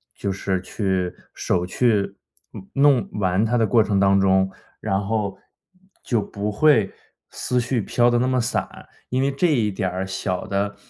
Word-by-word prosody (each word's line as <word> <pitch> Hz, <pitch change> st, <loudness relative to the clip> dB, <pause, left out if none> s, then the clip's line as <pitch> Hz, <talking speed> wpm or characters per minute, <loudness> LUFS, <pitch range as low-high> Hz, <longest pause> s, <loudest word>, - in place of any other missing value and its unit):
就 100 Hz, -, -3 dB
是 95 Hz, -1 st, -2 dB
去 95 Hz, -2 st, -2 dB, 0.2 s
手 90 Hz, -2 st, -1 dB
去 100 Hz, -1 st, +1 dB, 0.6 s
弄 135 Hz, -7 st, +3 dB
玩 95 Hz, -1 st, +1 dB
它 115 Hz, +2 st, +1 dB
的 115 Hz, -2 st, +2 dB
过 115 Hz, -1 st, +4 dB
程 100 Hz, -2 st, 0 dB
当 100 Hz, 0 st, +4 dB
中， 95 Hz, 0 st, +3 dB, 0.3 s
然 95 Hz, +1 st, -1 dB
后 100 Hz, -2 st, -2 dB, 0.7 s
就 115 Hz, -4 st, 0 dB
不 100 Hz, +1 st, -4 dB
会 110 Hz, -3 st, +3 dB, 0.4 s
思 125 Hz, -, -1 dB
绪 120 Hz, 0 st, 0 dB
飘 120 Hz, +3 st, +2 dB
得 120 Hz, 0 st, +2 dB
那 125 Hz, -, +1 dB
么 130 Hz, 0 st, +1 dB
散， 115 Hz, -, -3 dB, 0.2 s
因 130 Hz, +1 st, 0 dB
为 135 Hz, -, +2 dB
这 140 Hz, +6 st, +1 dB
一 120 Hz, -10 st, +2 dB
点 95 Hz, -1 st, -2 dB
儿 95 Hz, +1 st, -3 dB
小 95 Hz, -1 st, -3 dB
的 100 Hz, +1 st, -1 dB
100 Hz, 180 characters per minute, -22 LUFS, 95-120 Hz, 0.7 s, 过